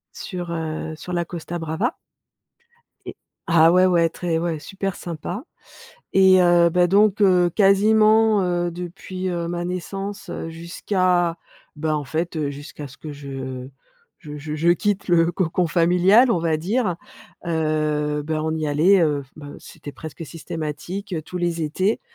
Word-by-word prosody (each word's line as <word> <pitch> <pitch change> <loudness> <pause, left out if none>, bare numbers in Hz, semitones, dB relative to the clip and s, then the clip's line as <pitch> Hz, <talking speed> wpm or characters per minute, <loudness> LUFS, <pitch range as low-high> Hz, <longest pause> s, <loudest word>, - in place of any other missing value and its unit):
sur, 175 -3 -6
heu, 160 -1 -4
sur 180 +3 -8
la 175 0 0
Costa 175 0 -6
Brava 165 +9 -2 1.1
et - - -7 0.3
ah, 165 0 +5
ouais, 185 +1 +5
ouais, 170 -2 +3
très 165 -1 -2
ouais, 165 -2 -2
super 195 +3 -4
sympa 175 - -6 0.7
et 190 -1 +6
heu, 175 -1 +5
ben, 180 +1 +3
donc, 205 +2 +3
heu, 180 -3 +4
quasiment, 215 +2 +4
heu, 175 -1 0
depuis, 185 +1 -6
heu, 170 -1 -2
ma 175 0 -3
naissance, 195 +2 -5
heu, 165 - -5
jusqu'à, 175 +1 0 0.4
bah, 155 0 0
en 150 - -2
fait, 160 +4 -3
heu, 150 -2 -1
jusqu'à 145 0 -8
ce 140 - -15
que 155 - -8
je 135 -2 -7 0.5
je 150 -4 -9
je 150 +1 -5
je 165 +3 +2
quitte 200 +3 +1
le 170 -1 +3
cocon 175 -1 0
familial, 180 +8 +4
on 170 - +1
va 160 -2 0
dire, 190 +1 -1 0.5
heu, 155 -2 0
ben, 155 -1 -2
on 160 0 -1
y 155 -1 -2
allait, 170 +7 +4
heu, 145 -3 +1
ben, 145 -1 -9
c'était 145 - -11
presque 160 +3 -8
systématique, 165 +5 -6
heu, 160 - -2
tous 180 +4 -7
les 170 -1 -1
étés. 185 +8 0
170 Hz, 160 wpm, -22 LUFS, 155-185 Hz, 1.1 s, et